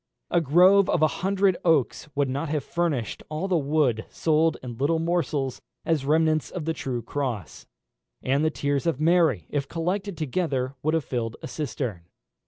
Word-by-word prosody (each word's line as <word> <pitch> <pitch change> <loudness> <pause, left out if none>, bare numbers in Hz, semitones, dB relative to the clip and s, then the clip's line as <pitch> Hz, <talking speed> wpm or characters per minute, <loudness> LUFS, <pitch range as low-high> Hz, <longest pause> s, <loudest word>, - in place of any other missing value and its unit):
A 175 - +3
grove 180 +6 +5
of 155 - +2
a - - +7
hundred 195 -1 +2
oaks 155 -3 +1
would 140 -1 +2
not 140 +4 -3
have 150 -2 -1
furnished 155 -10 -2
all 155 +5 -2
the 185 - +1
wood 140 -7 +1
sold 160 0 +1
in 120 -2 -7
little 155 +4 +2
morsels 160 -6 -1 0.2
as 155 -5 0
remnants 155 0 +2
of 175 -5 -5
the 165 - 0
true 125 -6 -4
cross; 125 - -4 0.6
and 140 +3 +1
the 155 - +3
tears 145 0 -1
of 160 -5 0
Mary, 155 - +3
if 140 -2 -1
collected 185 +3 -2
together, 140 -4 -1
would 155 +2 +1
have 160 - -1
filled 115 -3 -3
a - - -4
cistern. 120 - -4
155 Hz, 175 wpm, -25 LUFS, 135-165 Hz, 0.6 s, a